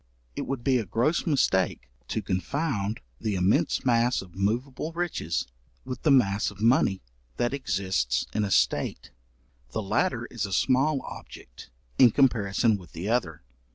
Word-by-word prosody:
It -, -, -4 dB
would 135 Hz, -3 st, -3 dB
be 130 Hz, -2 st, +3 dB
a 110 Hz, -, -3 dB
gross 125 Hz, -, 0 dB
mistake 95 Hz, -, +1 dB, 0.2 s
to 110 Hz, -, -3 dB
confound 105 Hz, -, -2 dB, 0.2 s
the 105 Hz, -2 st, -2 dB
immense 95 Hz, +7 st, +1 dB
mass 120 Hz, -2 st, +2 dB
of 90 Hz, -2 st, -16 dB
moveable 125 Hz, -, -2 dB
riches 165 Hz, -, -2 dB, 0.4 s
with 130 Hz, -1 st, -6 dB
the 155 Hz, -, +2 dB
mass 110 Hz, -7 st, +3 dB
of 100 Hz, 0 st, -14 dB
money 110 Hz, -4 st, +3 dB, 0.3 s
that 120 Hz, +2 st, 0 dB
exists 95 Hz, -, -1 dB
in 105 Hz, -, 0 dB
a 100 Hz, -, -1 dB
state; 95 Hz, -, 0 dB, 0.6 s
the -, -, -1 dB
latter -, -, 0 dB
is -, -, -2 dB
a 95 Hz, -, -6 dB
small 135 Hz, +6 st, +2 dB
object -, -, -11 dB, 0.3 s
in 125 Hz, -, +9 dB
comparison 115 Hz, -4 st, +2 dB
with 90 Hz, -3 st, -15 dB
the 90 Hz, +5 st, -4 dB
other. 80 Hz, -, -1 dB
110 Hz, 155 wpm, -27 LUFS, 95-130 Hz, 0.6 s, in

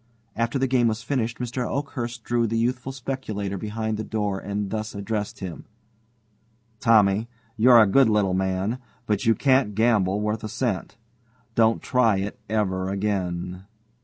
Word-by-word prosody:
After 115 Hz, +3 st, 0 dB
the 135 Hz, -, +1 dB
game 125 Hz, -2 st, +3 dB
was 110 Hz, 0 st, -2 dB
finished, 120 Hz, -3 st, -1 dB
Mr. 125 Hz, +1 st, -3 dB
Oakhurst 120 Hz, -5 st, -4 dB
drew 120 Hz, -1 st, +1 dB
the 115 Hz, +1 st, -1 dB
youthful 125 Hz, +3 st, -1 dB
speculator 125 Hz, -7 st, -4 dB
behind 110 Hz, +2 st, -3 dB
the 110 Hz, -, -3 dB
door 105 Hz, -3 st, -2 dB
and 100 Hz, 0 st, -3 dB
thus 110 Hz, -1 st, -4 dB
addressed 105 Hz, +1 st, -3 dB
him: 90 Hz, -3 st, -6 dB, 1.1 s
"Tommy, 110 Hz, -1 st, +4 dB, 0.3 s
you're 120 Hz, +1 st, +7 dB
a 110 Hz, -, +7 dB
good 120 Hz, +4 st, +4 dB
little 105 Hz, -3 st, +2 dB
man, 95 Hz, +5 st, -1 dB, 0.3 s
but 105 Hz, -3 st, 0 dB
you 115 Hz, -, +5 dB
can't 130 Hz, -4 st, +2 dB
gamble 105 Hz, -4 st, +2 dB
worth 105 Hz, +1 st, -2 dB
a 110 Hz, -, -4 dB
cent. 105 Hz, -4 st, -2 dB, 0.6 s
Don't 115 Hz, 0 st, +3 dB
try 115 Hz, -5 st, +3 dB
it 100 Hz, +2 st, -4 dB
over 95 Hz, -4 st, 0 dB
again." 95 Hz, -2 st, -2 dB
110 Hz, 155 wpm, -24 LUFS, 100-120 Hz, 1.1 s, you're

